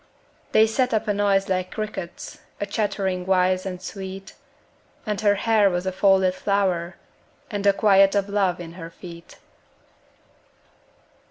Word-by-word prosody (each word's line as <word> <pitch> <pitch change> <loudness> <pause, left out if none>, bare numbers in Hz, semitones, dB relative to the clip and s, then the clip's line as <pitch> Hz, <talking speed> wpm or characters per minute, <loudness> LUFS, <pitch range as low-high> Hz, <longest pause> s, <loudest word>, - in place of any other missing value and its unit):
They 220 - +6
set 250 +2 0
up 220 +1 -1
a 210 - +2
noise 200 -1 +1
like 185 -1 -1
crickets, 210 -5 -6 0.2
A 205 - -1
chattering 200 -3 -2
wise 185 0 +2
and 180 -1 -5
sweet, 190 +1 -8 0.7
And 210 -2 -2
her 205 -1 +3
hair 210 -1 +3
was 180 0 -2
a 190 - -1
folded 190 -1 +3
flower 185 -3 -1 0.6
And 205 -1 -3
the 200 - +5
quiet 195 -1 +4
of 200 -1 +1
love 195 -4 0
in 170 -2 -8
her 165 - -7
feet. 170 0 -12
195 Hz, 145 wpm, -23 LUFS, 185-205 Hz, 0.7 s, They